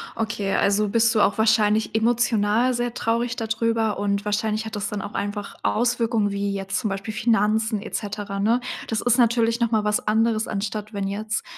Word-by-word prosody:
okay, 205 -3 -2
also, 200 +1 +2
bist 230 +2 +3
du 215 - +3
auch 200 - +2
wahrscheinlich 220 -1 +2
emotional 230 +1 +2
sehr 240 0 -2
traurig 235 +2 -1
da 225 - -3
drüber 225 -1 0
und 200 0 -1
wahrscheinlich 215 +1 -1
hat 220 - -6
das 205 - -2
dann 205 -2 -4
auch 205 - -7
einfach 205 0 -4
Auswirkungen 230 -3 +1
wie 200 0 -2
jetzt 195 0 -2
zum 220 - -2
Beispiel 195 +2 -4
Finanzen 220 -1 +1
et - - -9
cetera, 205 -1 -4
ne? 225 +5 +2 0.3
Das 225 - -1
ist 245 +1 +2
natürlich 230 0 +3
noch 235 -1 +1
mal 220 -2 +1
was 210 0 0
anderes, 220 0 +2
anstatt 210 +1 -4
wenn 200 -1 -2
jetzt 215 +3 -3
215 Hz, 190 wpm, -23 LUFS, 205-230 Hz, 0.3 s, bist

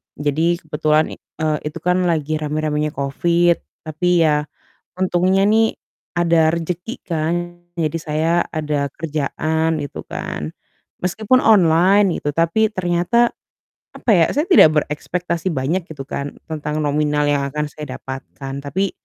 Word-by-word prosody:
jadi 160 +4 +1
kebetulan 155 0 +1
i - - -11 0.3
eee, 155 -1 +1
itu 165 +2 -9
kan 180 0 +2
lagi 155 -2 0
rame-ramenya 150 0 -1
covid, 170 +5 +2 0.2
tapi 170 +2 +1
ya, 150 -1 +2 0.5
untungnya 185 +1 +2
nih, 220 +1 +3 0.4
ada 165 -2 +4
rezeki 175 - -4
kan 165 -2 -1 0.5
jadi 155 0 0
saya 155 +1 0 0.2
ada 150 -3 -1
kerjaan 160 +1 -1
gitu 145 - -7
kan, 75 +2 -5 0.5
meskipun 220 +7 +2
online 190 -1 +5
gitu, 145 - -2
tapi 170 +7 +2
ternyata, 185 +6 +2 0.6
apa 235 - 0
ya, 165 - +5
saya 295 +4 +1
tidak 350 - +8
berekspektasi 170 +4 -3
banyak 155 +7 -1
gitu 145 -3 -6
kan 140 0 -5
tentang 155 -1 -3
nominal 150 0 +1
yang 145 -1 +1
akan 150 0 -2
saya 150 -4 -7
dapatkan, 135 +1 -7
tapi 190 +7 -1
160 Hz, 130 wpm, -20 LUFS, 150-175 Hz, 0.6 s, tidak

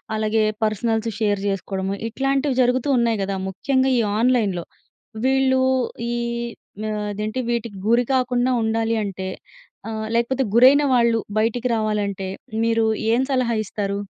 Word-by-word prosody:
అలాగే 215 0 +1 0.2
personals 225 +1 0
share 205 -2 +1
జేసుకోవడము. 195 0 -2
ఇట్లాంటివి 270 +2 0
జరుగుతూ 250 +2 +1
ఉన్నాయి 230 -3 +1
గదా! 195 0 -2
ముఖ్యంగా 260 +7 +1
ఈ - - +3 0.2
ఆన్లైన్‌లో 220 -8 +1 0.6
వీళ్ళు 265 0 +3 0.5
ఈ - - -1 0.8
ఆహ్, 210 -1 -2
అదేంటి 215 +4 -3
వీటికి 235 -3 -3
గురి 240 +1 +4
కాకుండా 250 -1 +1
ఉండాలి 225 +1 0
అంటే 190 -1 -5 0.6
ఆహ్, 220 0 -4
లేకపోతే 240 +3 +1
గురైన 260 +5 +7
వాళ్ళు 235 -2 +3 0.2
బయటికి 235 +3 +1
రావాలంటే 205 -3 -1 0.4
మీరు 230 -1 +2 0.3
ఏం 245 - +3
సలహా 250 -3 +1
ఇస్తారు? 200 -1 -3
230 Hz, 130 wpm, -22 LUFS, 210-250 Hz, 0.8 s, గురైన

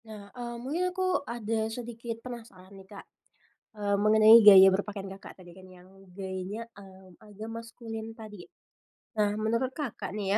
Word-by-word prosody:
Nah, 210 -2 -12
eee, 240 -1 -7
mungkin 280 +9 -3
aku 370 0 -1
ada 220 -1 -2
sedikit 230 0 -7
penasaran 225 -6 -11
nih 195 -1 -14
Kak, 200 - -11 0.8
eee, 200 -1 +1
mengenai 215 +2 +7
gaya 195 -2 +10
berpakaian 195 +1 -2
Kakak 195 - -14
tadi 175 -1 -15
kan, 190 - -14
yang 180 0 -17 0.2
gayanya, 190 +4 -6
eee, 190 -2 -15
agak 215 +1 -10
maskulin 225 -1 -8
tadi. 215 -4 -11 0.8
Nah, 205 0 +2
menurut 230 +4 -1
Kakak 275 -8 -5
nih 205 -2 -4
215 Hz, 150 wpm, -28 LUFS, 195-230 Hz, 0.8 s, gaya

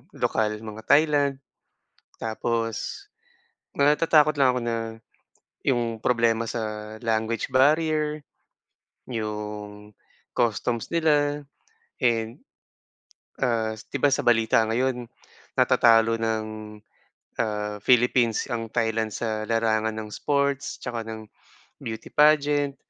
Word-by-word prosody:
lokal, 110 -1 0
mga 110 0 -8
Thailand 145 -2 +3 0.8
tapos, 115 0 -3 0.7
natatakot 150 +1 +4
lang 135 -2 +5
ako 125 - -1
na 115 0 -1 0.9
'yong 120 -4 0
problema 115 -1 +1
sa 110 -1 -5
language 115 +2 -1
barrier, 150 +2 +2 0.9
'yong 105 -2 -6 0.4
customs 115 +1 -1
nila. 150 -3 +2 0.6
And 115 -1 0 1.0
ah, 115 -3 +1
'di 110 +5 -7
ba 140 0 +3
sa - - +1
balita 115 -1 +4
ngayon 125 0 -1 0.5
natatalo 115 -1 +5
ng, 110 -1 0 0.9
ah, 105 -2 -2
Philippines 120 -2 +3
ang 115 -2 -4
Thailand 110 -1 0
sa 110 -2 -2
larangan 110 -1 +1
ng 110 -1 -7
sports 140 +4 -1
tsaka 120 -2 -4
ng 110 -1 -8 0.5
beauty 110 -1 -7
pageant. 145 -1 +3
115 Hz, 95 wpm, -25 LUFS, 110-140 Hz, 1.0 s, lang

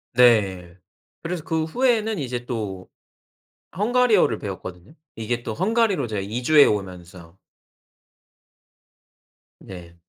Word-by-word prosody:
네. 95 -8 +3 0.5
그래서 170 -2 -4
그 160 -1 -1
후에는 220 +1 0
이제 120 -3 -4
또 100 -6 -5 0.9
헝가리어를 215 - +2
배웠거든요. 95 - -8 0.2
이게 120 +2 -3
또 110 - -5
헝가리로 200 - +1
제가 105 -3 -4
이주해 125 +8 +4
오면서. 90 -3 -5 2.2
네. 85 -2 -12
120 Hz, 220 characters per minute, -23 LUFS, -, 2.2 s, 이주해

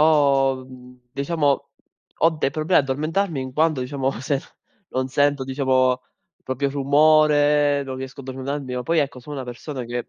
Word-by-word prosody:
ho 140 -4 +3
mhmm, 125 -1 -14
diciamo, 140 0 0 0.5
ho 165 - +4
dei 155 -3 -1
problemi 155 +5 +1
a - - +8
addormentarmi 155 +5 -1
in 130 -1 -5
quando, 155 -1 +1
diciamo, 135 +1 -1
se 135 +2 -1 0.5
non 130 0 -2
sento, 145 0 +1
diciamo, 130 -1 +1 0.4
proprio 130 +2 -2
rumore, 145 0 +4
non 130 -1 -6
riesco 130 +1 -7
a - - -10
addormentarmi, 130 0 -5
o 125 - -2
poi 165 +4 +2
ecco 140 -3 -3
sono 145 +4 -8
una 130 - -4
persona 125 +2 -6
che 120 +1 -5
140 Hz, 165 wpm, -22 LUFS, 130-150 Hz, 0.5 s, a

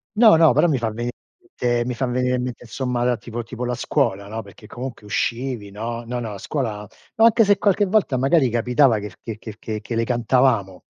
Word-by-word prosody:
No, 220 -3 +7
no, 160 -4 +6
però 150 +7 +4
mi 150 -5 +1
fa 115 -1 -1
venire 120 +3 -4
in 365 -1 -34
mente 120 -1 +1
mi 125 - -2
fa 125 +3 -2
venire 125 +1 0
in 125 - -1
mente, 125 -1 -6
insomma 125 0 -2
la 125 0 +2
tipo 120 0 -6
tipo 120 +1 -7
la 125 0 -1
scuola, 100 -3 -1
no, 110 +2 -5
perché 100 0 -15
comunque 120 -1 -8
uscivi, 115 +3 -2
no. 115 +4 -5
No, 125 +1 -3
no, 115 -3 -5
a - - -7
scuola 105 -5 -3 0.3
ma 225 - +5
anche 230 0 +5
se 205 0 +4
qualche 205 0 +3
volta 195 -9 +1
magari 135 +1 +3
capitava 125 +1 +3
che 105 0 -6
f - - -18
che 115 -1 -6
che 110 -1 -9
che 110 -1 -5
che 115 +2 -5
le 115 - +1
cantavamo. 120 -5 +1
120 Hz, 235 wpm, -22 LUFS, 110-130 Hz, 0.3 s, No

